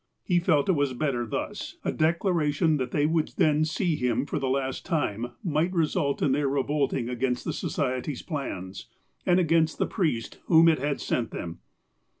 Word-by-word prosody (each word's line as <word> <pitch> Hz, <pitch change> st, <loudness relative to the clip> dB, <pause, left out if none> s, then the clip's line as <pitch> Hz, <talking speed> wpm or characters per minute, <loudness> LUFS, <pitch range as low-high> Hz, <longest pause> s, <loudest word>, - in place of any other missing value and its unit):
He 175 Hz, -2 st, +2 dB
felt 160 Hz, -5 st, +2 dB
it -, -, +4 dB
was 145 Hz, -6 st, +1 dB
better 120 Hz, -3 st, -1 dB
thus. -, -, -4 dB
A -, -, +1 dB
declaration 160 Hz, -2 st, +1 dB
that 130 Hz, -2 st, -2 dB
they 145 Hz, +3 st, +1 dB
would 160 Hz, 0 st, 0 dB
then 155 Hz, 0 st, +3 dB
see 160 Hz, +1 st, 0 dB
him 125 Hz, -1 st, 0 dB
for -, -, -2 dB
the 135 Hz, -, -1 dB
last 130 Hz, 0 st, -1 dB
time 120 Hz, -, -2 dB
might 165 Hz, 0 st, +1 dB
result 155 Hz, -5 st, 0 dB
in 135 Hz, -, +3 dB
their 140 Hz, +1 st, +1 dB
revolting 140 Hz, -2 st, 0 dB
against 125 Hz, 0 st, -1 dB
the -, -, -1 dB
Society's 130 Hz, 0 st, -2 dB
plans, 100 Hz, -, -5 dB, 0.4 s
and 180 Hz, 0 st, +5 dB
against 165 Hz, -2 st, +2 dB
the -, -, +1 dB
priest 150 Hz, -, -2 dB
whom 165 Hz, -1 st, +6 dB
it 160 Hz, -3 st, +4 dB
had 145 Hz, +1 st, -1 dB
sent 115 Hz, -3 st, -1 dB
them. 85 Hz, -1 st, -6 dB
145 Hz, 175 wpm, -27 LUFS, 130-160 Hz, 0.4 s, whom